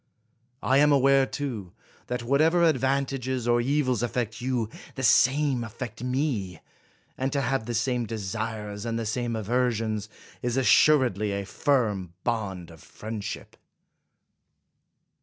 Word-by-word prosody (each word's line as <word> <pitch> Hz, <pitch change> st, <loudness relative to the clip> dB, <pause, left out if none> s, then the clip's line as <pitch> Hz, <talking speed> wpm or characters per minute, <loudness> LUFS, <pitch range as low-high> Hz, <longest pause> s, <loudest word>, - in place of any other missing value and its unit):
I 135 Hz, +2 st, +4 dB
am 150 Hz, 0 st, +5 dB
aware, 135 Hz, -1 st, +4 dB
too, 115 Hz, -11 st, -5 dB, 0.3 s
that 125 Hz, 0 st, -3 dB
whatever 155 Hz, +7 st, +3 dB
advan 135 Hz, 0 st, +1 dB
tages 130 Hz, -2 st, -3 dB
or 120 Hz, 0 st, +3 dB
evils 130 Hz, -2 st, +1 dB
affect 115 Hz, -2 st, -2 dB
you, 125 Hz, -3 st, -1 dB, 0.3 s
the 135 Hz, -, -4 dB
same 130 Hz, +2 st, +4 dB
affect 115 Hz, 0 st, -7 dB
me; 125 Hz, -, -1 dB, 0.6 s
and 135 Hz, +1 st, 0 dB
to 140 Hz, -, 0 dB
have 125 Hz, -3 st, -1 dB
the 120 Hz, -, -2 dB
same 120 Hz, 0 st, 0 dB
desires 105 Hz, 0 st, -4 dB
and 115 Hz, -1 st, -2 dB
the 115 Hz, -, -3 dB
same 120 Hz, +2 st, -2 dB
aversions, 110 Hz, -1 st, -1 dB, 0.3 s
is 120 Hz, +1 st, -1 dB
assuredly 120 Hz, -4 st, +4 dB
a 100 Hz, 0 st, -3 dB
firm 105 Hz, -, 0 dB
bond 95 Hz, -7 st, -3 dB
of 80 Hz, -, -14 dB
friendship. 110 Hz, -2 st, -7 dB
120 Hz, 130 wpm, -26 LUFS, 110-135 Hz, 0.6 s, am